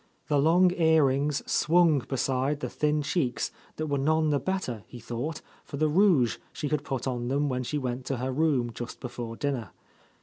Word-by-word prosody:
The 145 Hz, -1 st, +3 dB
long 175 Hz, +5 st, +4 dB
earrings 150 Hz, -4 st, +2 dB
swung 165 Hz, -2 st, +3 dB
beside 135 Hz, +2 st, -1 dB
the -, -, -3 dB
thin 150 Hz, 0 st, 0 dB
cheeks 140 Hz, -5 st, -1 dB, 0.2 s
that 155 Hz, -, -3 dB
were 145 Hz, -2 st, -1 dB
none 155 Hz, +2 st, +2 dB
the 145 Hz, -, +2 dB
better, 135 Hz, -, -3 dB
he 125 Hz, -, -10 dB
thought, 125 Hz, +7 st, -4 dB, 0.2 s
for 140 Hz, -, -7 dB
the 155 Hz, +2 st, +2 dB
rouge 160 Hz, -, +4 dB
she 150 Hz, -2 st, -4 dB
had 150 Hz, -1 st, 0 dB
put 130 Hz, -3 st, -3 dB
on 120 Hz, -2 st, -2 dB
them 140 Hz, +3 st, +1 dB
when 125 Hz, -1 st, -1 dB
she 140 Hz, +4 st, -2 dB
went 125 Hz, -2 st, -3 dB
to 135 Hz, -, -1 dB
her 130 Hz, +2 st, -2 dB
room 130 Hz, -4 st, +1 dB
just 120 Hz, 0 st, -7 dB
before 120 Hz, -2 st, -6 dB
dinner. 130 Hz, -6 st, -2 dB
140 Hz, 190 wpm, -28 LUFS, 125-155 Hz, 0.2 s, long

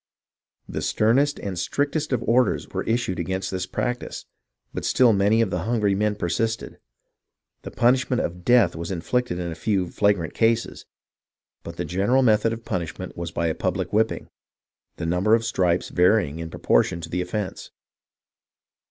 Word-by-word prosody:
The -, -, -4 dB
sternest 135 Hz, +7 st, +2 dB
and 95 Hz, -3 st, -4 dB
strictest 145 Hz, -, -1 dB
of 125 Hz, -3 st, 0 dB
orders 125 Hz, +2 st, +2 dB
were -, -, -3 dB
issued 115 Hz, -5 st, -1 dB
against 95 Hz, +2 st, -2 dB
this 95 Hz, -1 st, -3 dB
practice, 125 Hz, 0 st, -3 dB, 0.5 s
but -, -, -4 dB
still 125 Hz, -3 st, +4 dB
many 100 Hz, +3 st, +3 dB
of 110 Hz, -5 st, 0 dB
the 90 Hz, -, -1 dB
hungry 110 Hz, -4 st, +1 dB
men 105 Hz, +1 st, 0 dB
persisted. 105 Hz, +4 st, -2 dB, 0.8 s
The -, -, -7 dB
punishment 125 Hz, +1 st, +2 dB
of 90 Hz, +1 st, -4 dB
death 120 Hz, -4 st, +4 dB
was 85 Hz, +1 st, -5 dB
inflicted 95 Hz, +3 st, -1 dB
in 85 Hz, -1 st, -3 dB
a -, -, -3 dB
few 95 Hz, -1 st, -1 dB
flagrant 100 Hz, -6 st, +1 dB
cases, 115 Hz, 0 st, 0 dB, 0.7 s
but 85 Hz, -, -8 dB
the 85 Hz, -, -2 dB
general 100 Hz, +11 st, +2 dB
method 110 Hz, -1 st, +3 dB
of 115 Hz, 0 st, -6 dB
punishment 85 Hz, -6 st, -4 dB
was 85 Hz, -1 st, -4 dB
by 85 Hz, -, -2 dB
a 80 Hz, -, +1 dB
public 95 Hz, +1 st, -2 dB
whipping, 110 Hz, +2 st, +1 dB, 0.7 s
the -, -, -5 dB
number 90 Hz, +6 st, +3 dB
of 115 Hz, 0 st, -1 dB
stripes 90 Hz, -5 st, +1 dB
varying 90 Hz, -4 st, +2 dB
in 80 Hz, 0 st, -5 dB
proportion 85 Hz, -, +1 dB
to -, -, -7 dB
the 90 Hz, -, -1 dB
offence. 95 Hz, +2 st, -4 dB
100 Hz, 160 wpm, -24 LUFS, 90-115 Hz, 0.8 s, still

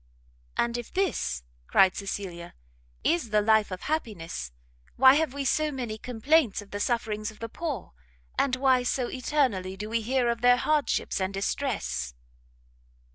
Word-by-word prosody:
"And 235 Hz, 0 st, +1 dB
if 240 Hz, -, -8 dB
this," 210 Hz, -, -1 dB, 0.2 s
cried 190 Hz, -1 st, +5 dB
Cecilia, 190 Hz, -3 st, -5 dB, 0.5 s
"is 330 Hz, -8 st, +1 dB
the 210 Hz, 0 st, +3 dB
life 220 Hz, 0 st, +3 dB
of 185 Hz, -1 st, -6 dB
happiness, 185 Hz, -, -3 dB, 0.4 s
why 260 Hz, +1 st, +8 dB
have 305 Hz, -1 st, +2 dB
we 280 Hz, 0 st, -4 dB
so 310 Hz, +3 st, +2 dB
many 240 Hz, -5 st, -4 dB
complaints 250 Hz, +1 st, +2 dB
of 205 Hz, -1 st, -10 dB
the 205 Hz, -, -4 dB
sufferings 215 Hz, -2 st, -1 dB
of 215 Hz, -, -13 dB
the 230 Hz, -, -5 dB
poor, 285 Hz, -, -5 dB, 0.4 s
and 260 Hz, -2 st, +2 dB
why 260 Hz, -1 st, +3 dB
so 245 Hz, 0 st, -1 dB
eternally 250 Hz, -9 st, 0 dB
do 210 Hz, +2 st, -6 dB
we 230 Hz, 0 st, +1 dB
hear 250 Hz, +2 st, +1 dB
of 235 Hz, -1 st, 0 dB
their 245 Hz, 0 st, +6 dB
hardships 300 Hz, -7 st, 0 dB
and 190 Hz, +1 st, 0 dB
distress?" 70 Hz, -, -2 dB
235 Hz, 155 wpm, -27 LUFS, 200-265 Hz, 0.5 s, why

